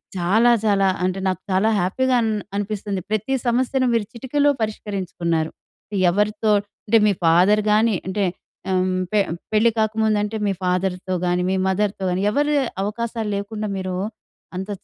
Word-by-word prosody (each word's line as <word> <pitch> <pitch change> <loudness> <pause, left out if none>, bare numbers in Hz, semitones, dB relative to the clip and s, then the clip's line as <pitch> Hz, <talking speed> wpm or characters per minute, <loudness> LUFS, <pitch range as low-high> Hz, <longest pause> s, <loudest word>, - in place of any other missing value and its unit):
చాలా 205 +7 +3
చాలా 195 -2 +3 0.2
అంటే, 185 +1 0
నాకు 185 -1 -1
చాలా 195 +4 +3
హ్యాపీగా 255 +9 +1
అన్ 220 -1 0 0.2
అనిపిస్తుంది. 205 -1 -3
ప్రతి 215 +5 -1
సమస్యను 255 +2 +1
మీరు 230 -3 +1
చిటికలో 285 +4 +1
పరిష్కరించుకున్నారు. 180 -6 -2 0.6
ఎవరితో 210 +3 0 0.4
అంటే, 225 +2 +5
మీ - - +4
ఫాదర్‌ 185 +6 +5
గానీ, 215 0 +3
అంటే 195 +1 0 0.5
ఆహ్, 185 0 +2 0.3
పే 210 - +3 0.3
పెళ్లి 220 +2 +5
కాకముందంటే, 215 -1 +1
మీ - - +2
ఫాదర్‌తో 180 0 -1
గానీ, 180 0 +1
మీ - - +1
మదర్‌తో 195 +1 0
గానీ, 180 +2 -1
ఎవరీ 290 +4 +1 0.3
అవకాశాలు 225 +1 -3
లేకుండా, 210 +1 -4
మీరు 185 -1 -3 0.6
అంత 190 +3 -5
210 Hz, 140 wpm, -22 LUFS, 185-220 Hz, 0.6 s, అంటే